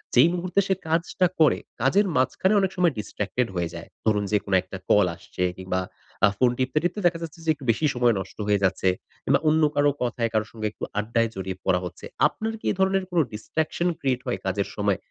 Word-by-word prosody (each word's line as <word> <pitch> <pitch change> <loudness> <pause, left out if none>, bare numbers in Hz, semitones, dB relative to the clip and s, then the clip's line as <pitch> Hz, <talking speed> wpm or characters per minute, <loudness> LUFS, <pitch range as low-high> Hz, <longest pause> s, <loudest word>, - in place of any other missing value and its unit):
যেই 130 +7 +7
মুহূর্তে 180 +2 0
সে 190 - +3
কাজটা 170 +3 +1
করে, 155 - +5 0.2
কাজের 200 +1 +3
মাঝখানে 160 +10 +2
অনেক 190 -1 +1
সময় 175 -4 +3
distracted 105 +3 -2
হয়ে 85 -2 -1
যায়। - - -9 0.2
ধরুন 105 -2 +2
যে, 105 - +4
কোনো 100 - +1
একটা 95 +1 -8
call 105 -2 +6
আসছে 90 - -5
কিংবা 95 0 -2 0.5
আ - - +7
ফোন 125 -1 +4
টিপতে, 130 +3 -1
টিপতে 175 +4 -1
দেখা 170 -1 -1
যাচ্ছে 165 0 -8
যে, - - -1
একটু 145 -3 -12
বেশি 135 +7 -1
সময় 120 -1 +4
নষ্ট 95 0 -8
হয়ে 100 -1 +2
যাচ্ছে। 95 0 +2 0.3
কিংবা - - +3
অন্য 155 +1 +4
কারও 145 0 +4
কথায় 120 -1 -1
কারও 110 -1 +1
সঙ্গে 110 -1 -3
একটু - - -12 0.2
আড্ডায় 115 +2 +1
জড়িয়ে 95 -1 -4
পড়া 90 -1 +3
হচ্ছে। 90 0 -8 0.2
আপনার 220 +8 -4
কি - - -13
এ - - 0
ধরনের 190 0 +2
কোনো 175 -2 +3
distraction 160 +10 -2
create 130 -2 0
হয় 125 - -1
কাজের 95 +1 0
সময়? 100 -2 +1
125 Hz, 210 wpm, -25 LUFS, 100-165 Hz, 0.5 s, যেই